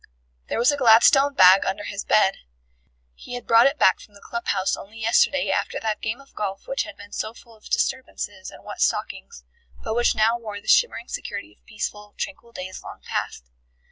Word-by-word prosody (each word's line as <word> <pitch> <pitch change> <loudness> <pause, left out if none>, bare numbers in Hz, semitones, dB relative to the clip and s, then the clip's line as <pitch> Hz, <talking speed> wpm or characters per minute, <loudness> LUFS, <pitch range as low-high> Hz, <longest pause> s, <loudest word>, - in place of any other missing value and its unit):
There - - -2
was 240 +4 +4
a 290 - -2
Gladstone 270 +3 +5
bag 185 +1 +7
under 195 +2 -3
his 200 -1 -5
bed. 195 -2 +3 0.8
He 245 - -9
had 245 - -7
brought 230 +2 +6
it 275 +2 -1
back 190 - +4
from 205 - -17
the - - -14
club 235 +3 -6
house 190 - +1
only 215 +3 -12
yesterday 230 +5 +2
after - - -1
that 220 -1 -3
game 220 +4 -3
of 275 - -19
golf 195 -2 -4
which 270 - -1
had 320 -2 -11
been 205 0 -13
so 220 +2 -4
full 230 -2 -17
of 215 - -16
disturbances 205 -7 -2
and - - -14
wet - - -8
stockings, 465 0 -2 0.4
but 220 - -2
which 240 +1 +2
now 225 +2 +2
wore 210 -3 -7
the - - -20
shimmering 485 - +3
security - - -6
of - - -35
peaceful, 210 -2 -6
tranquil 235 -5 -6
days 185 -3 -8
long - - -11
past. - - -5
220 Hz, 205 wpm, -23 LUFS, 205-245 Hz, 0.8 s, bag